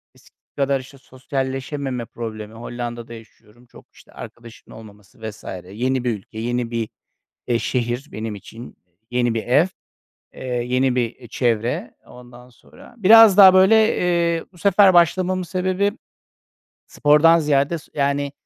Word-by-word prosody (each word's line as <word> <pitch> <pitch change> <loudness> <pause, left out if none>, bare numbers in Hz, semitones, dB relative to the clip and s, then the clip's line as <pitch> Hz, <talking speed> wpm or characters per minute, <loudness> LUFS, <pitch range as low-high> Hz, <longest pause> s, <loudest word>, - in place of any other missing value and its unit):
eskisi - - -27
kadar, 140 -1 0
işte, 135 +2 -14
sosyalleşememe 130 -1 -5
problemi, 110 -2 -8
Hollanda'da 120 0 -7
yaşıyorum, 115 +1 -17
çok, - - -18
işte, - - -20
arkadaşımın 115 -2 -13
olmaması 105 -1 -16
vs. 105 - -14 0.3
Yeni 125 +4 -2
bir 120 - 0
ülke, 110 +3 -12
yeni 120 0 -3
bir, 115 -2 -3 0.6
eee, 120 -1 +1
şehir 120 +3 -3
benim 110 -1 -5
için. 115 +4 -12 0.3
Yeni 120 -1 0
bir 110 - -2
ev, 140 - +3 0.7
eee, - - -11 0.2
yeni 125 +1 0
bir, 120 -2 -1
eee, 120 -2 -15
çevre. 120 0 -2
Ondan 125 0 -15
sonra 185 - -19
biraz 220 -1 +7
daha 190 -2 +9
böyle, 190 +3 +5 0.2
eee, 170 -2 0
bu 175 - -20
sefer 195 +1 +4
başlamamın 180 +2 +2
sebebi 185 +4 -1 0.9
spordan 150 +3 +4
ziyade 150 +1 0
s - - -19
yani, 140 0 -1
130 Hz, 140 wpm, -21 LUFS, 120-165 Hz, 0.9 s, daha